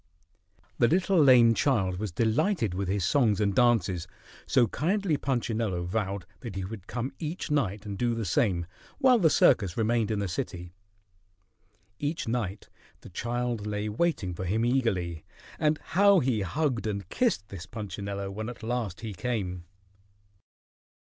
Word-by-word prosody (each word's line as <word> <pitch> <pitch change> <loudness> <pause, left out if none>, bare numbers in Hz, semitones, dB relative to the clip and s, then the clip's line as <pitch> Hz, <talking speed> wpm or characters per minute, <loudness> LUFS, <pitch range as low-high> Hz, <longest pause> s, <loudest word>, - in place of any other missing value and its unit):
The 120 - +5
little 185 +3 +2
lame 125 -5 +7
child 95 -9 +1
was 105 -3 -3
delighted 115 - +1
with 95 +1 -2
his 95 -1 0
songs 110 - +3
and 100 -2 +1
dances, 100 -7 +2 0.4
so 125 - +4
kindly 180 - 0
Punchinello 115 -9 -1
vowed 100 0 -2
that 115 -4 -7
he 95 -1 -3
would 100 -1 -8
come 125 +2 -4
each 160 0 -4
night 110 -8 0
and 100 -2 -5
do 120 -1 +1
the 115 -1 -3
same, 85 -1 +1 0.3
while 255 -2 +5
the 165 -5 +5
circus 100 - +3
remained 115 -1 +1
in 110 - 0
the 100 -1 -1
city. 90 -4 -5 1.3
Each 150 -1 -2
night 110 -4 -3 0.3
the - - -12
child 120 +2 -2
lay 105 0 -2
waiting 105 - 0
for 90 +2 -5
him 110 +6 +1
eagerly, 95 -10 0 0.4
and 150 0 +2
how 200 +4 +4
he 125 -6 0
hugged 125 - -1
and 100 -3 -3
kissed 225 - 0
this 90 -3 -8
Punchinello 100 -2 -5
when 110 +3 -5
at 120 -2 -10
last 115 -6 -3
he 110 -3 -5
came! 90 -4 -3
110 Hz, 155 wpm, -28 LUFS, 95-125 Hz, 1.3 s, lame